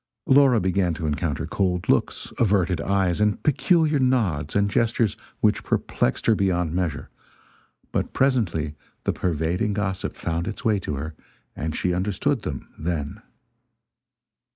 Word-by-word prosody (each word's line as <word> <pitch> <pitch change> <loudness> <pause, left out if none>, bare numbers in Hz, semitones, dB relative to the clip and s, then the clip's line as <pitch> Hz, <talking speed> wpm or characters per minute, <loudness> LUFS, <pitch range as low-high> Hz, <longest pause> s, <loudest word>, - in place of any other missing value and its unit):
Laura 135 -3 +5
began 95 -2 +1
to 80 - -4
encounter 75 0 -1
cold 90 0 -1
looks, - - 0
averted 95 -6 +2
eyes 95 -1 +1
and 105 0 +1
peculiar 155 0 +3
nods 105 - +1
and 100 0 +3
gestures 115 -1 +1 0.3
which - - +2
perplexed 65 - -1
her 115 - +5
beyond 90 -5 0
measure; 85 -5 -2 0.8
but - - -1
presently 100 - +1 0.3
the - - 0
pervading 90 +5 -1
gossip 95 -2 -2
found 85 0 -2
its 110 +5 -6
way 105 -3 +3
to 75 - -4
her, 75 +3 -5 0.4
and 80 +1 -3
she 90 - 0
understood 105 +8 0
them 70 - -5
then. 75 -3 -3
95 Hz, 135 wpm, -24 LUFS, 80-110 Hz, 0.8 s, Laura